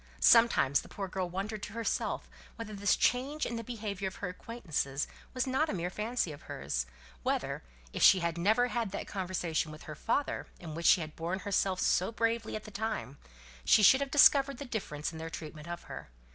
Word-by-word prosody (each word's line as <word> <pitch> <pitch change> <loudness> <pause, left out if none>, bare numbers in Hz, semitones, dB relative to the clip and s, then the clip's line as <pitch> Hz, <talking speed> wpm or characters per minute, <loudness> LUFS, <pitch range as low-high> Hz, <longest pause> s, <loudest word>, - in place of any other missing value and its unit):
Sometimes 230 - +5
the - - -14
poor 195 -1 -5
girl 185 -1 -3
wondered 200 +4 -4
to 210 - -6
herself 230 0 -2 0.3
whether 225 -2 -7
this 200 -1 +2
change 275 +5 +1
in 235 - -3
the 230 - -4
behaviour 210 -4 -4
of 190 - -6
her 190 - -4
acquaintances 165 - -3 0.3
was 255 - +1
not 270 +4 +1
a - - -1
mere 175 0 -2
fancy 215 -3 -1
of 145 - -10
hers; - - -3 0.3
whether, - - -1 0.3
if - - -3
she 195 - +8
had 170 -2 -1
never 220 +8 +3
had 235 -4 -1
that - - -3
conversation 175 -5 -2
with 155 - -11
her 155 - -7
father, 230 - -1
in 165 -4 -7
which 170 +2 -1
she 180 - +6
had 155 -1 -7
borne 175 +4 -3
herself 195 -2 0
so 185 +4 +2
bravely 230 -1 -1
at 215 - -5
the 215 - -10
time, 205 - -4 0.4
she 215 - +5
should 265 +7 +7
have 280 - -1
discovered 275 -1 +6
the 285 - -6
difference 180 - -4
in 160 - -8
their 165 0 -5
treatment 155 -1 -8
of 175 0 -6
her. - - -9
200 Hz, 205 wpm, -31 LUFS, 170-230 Hz, 0.4 s, she